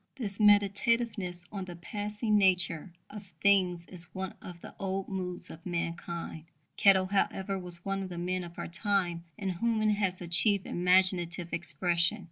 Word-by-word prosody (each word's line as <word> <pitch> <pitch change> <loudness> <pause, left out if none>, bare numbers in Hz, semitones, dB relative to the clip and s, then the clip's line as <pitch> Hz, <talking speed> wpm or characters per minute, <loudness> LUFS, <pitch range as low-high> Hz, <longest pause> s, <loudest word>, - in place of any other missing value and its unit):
This 210 -7 -3
meditativeness 205 -2 +2
on 195 -3 -5
the 175 -1 -8
passing 210 +4 -2
nature 180 -3 +2 0.2
of 205 -2 -9
things 180 -3 +3
is 175 -1 0
one 190 0 -4
of 175 -1 -10
the - - -10
old 195 -1 -2
moods 180 -2 -5
of 160 - -12
mankind. 170 -2 -4 0.3
Kettle, 190 -2 +5
however, 195 0 0
was 175 -1 -4
one 195 0 -1
of 190 - -5
the 175 - -7
men 180 +1 -2
of 170 0 -10
our - - -4
time 175 -2 -1
in 195 - -3
whom 220 +5 0
it 215 - +3
has 195 -3 0
achieved 185 +3 +2
imaginative 180 -1 +3
expression. 175 +4 +1
185 Hz, 160 wpm, -30 LUFS, 175-200 Hz, 0.3 s, Kettle